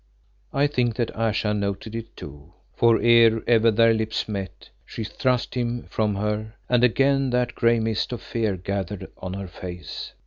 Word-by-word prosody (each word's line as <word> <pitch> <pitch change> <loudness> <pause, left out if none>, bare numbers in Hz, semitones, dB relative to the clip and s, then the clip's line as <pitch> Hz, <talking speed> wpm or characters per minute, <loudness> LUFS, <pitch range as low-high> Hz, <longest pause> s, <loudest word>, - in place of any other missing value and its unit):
I 140 +1 +2
think 125 -5 0
that 120 0 -2
Ayesha 110 -1 0
noted 100 +1 -3
it 115 0 -7
too, 75 +4 -11 0.2
for 115 -1 +4
ere 115 -1 +5
ever 115 -1 +4
their 115 +1 +4
lips 110 0 -2
met, 100 -3 -6
she 115 - -6
thrust 125 +3 -1
him 120 -1 -2
from 105 -2 0
her 105 +2 -3
and 125 -1 +2
again 135 +2 +3
that 125 0 0
grey 115 0 +3
mist 110 +1 -1
of 120 - -4
fear 110 -5 -2
gathered 100 +1 -4
on 90 +1 -6
her 100 -1 -5
face. 90 -2 -8
110 Hz, 170 wpm, -24 LUFS, 100-120 Hz, 0.2 s, ere